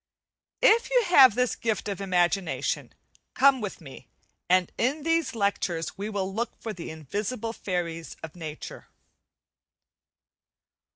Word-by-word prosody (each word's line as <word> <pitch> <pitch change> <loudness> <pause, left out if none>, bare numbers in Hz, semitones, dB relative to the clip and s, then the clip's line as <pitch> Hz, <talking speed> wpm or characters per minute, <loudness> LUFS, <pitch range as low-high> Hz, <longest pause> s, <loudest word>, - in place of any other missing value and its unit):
If 470 +1 +5
you - - +4
have 270 - +7
this 250 -1 +1
gift 225 -2 -2
of 200 -2 -4
imagination 185 0 0 0.4
come 265 -1 +5
with 205 -3 -5
me, 135 -5 -12 0.4
and 185 -1 +3
in 280 +5 0
these 330 -5 +1
lectures 195 -5 -1
we 205 +2 -4
will 195 -2 -3
look 230 +3 -3
for 220 - -5
the 175 - -7
invisible 205 - -4
fairies 170 -5 -4
of 160 0 -8
nature. 155 -3 -8
200 Hz, 125 wpm, -27 LUFS, 175-250 Hz, 0.4 s, have